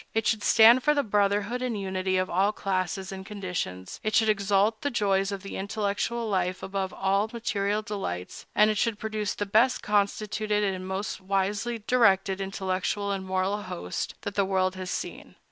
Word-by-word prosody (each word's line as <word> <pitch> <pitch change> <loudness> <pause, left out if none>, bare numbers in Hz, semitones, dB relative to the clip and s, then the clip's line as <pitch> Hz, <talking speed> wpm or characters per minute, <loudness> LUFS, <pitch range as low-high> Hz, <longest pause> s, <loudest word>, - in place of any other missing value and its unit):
It 225 -1 +1
should 220 - +1
stand 230 +3 +7
for 300 +3 +3
the 285 - +2
brotherhood 205 +2 +1
and 240 -4 -2
unity 190 -1 -1
of 185 0 +1
all 190 +4 +2
classes 190 -1 -2
and 190 0 -6
conditions; 180 - -5
it 215 -1 0
should 220 0 +4
exalt 205 +1 +2
the 285 - 0
joys 200 -5 +1
of 200 -1 -5
the 195 - -6
intellectual 205 +3 -2
life 185 -2 -1
above 190 -1 -2
all 195 +2 +1
material 210 -2 -1
delights; 145 - -5
and 210 +1 +5
it 210 - -1
should 230 -3 +1
produce 215 -2 -3
the 205 - -2
best 225 +6 +3
constituted 210 +1 0
and 185 -2 -2
most 190 +1 -3
wisely 200 +4 -1
directed 195 -5 +3
intellectual 195 +1 -2
and 190 -1 -3
moral 190 +2 0
host 90 - -5
that 205 - -4
the 200 - +2
world 190 -1 +1
has 185 -1 -6
seen. - - -5
200 Hz, 180 wpm, -27 LUFS, 190-215 Hz, -, stand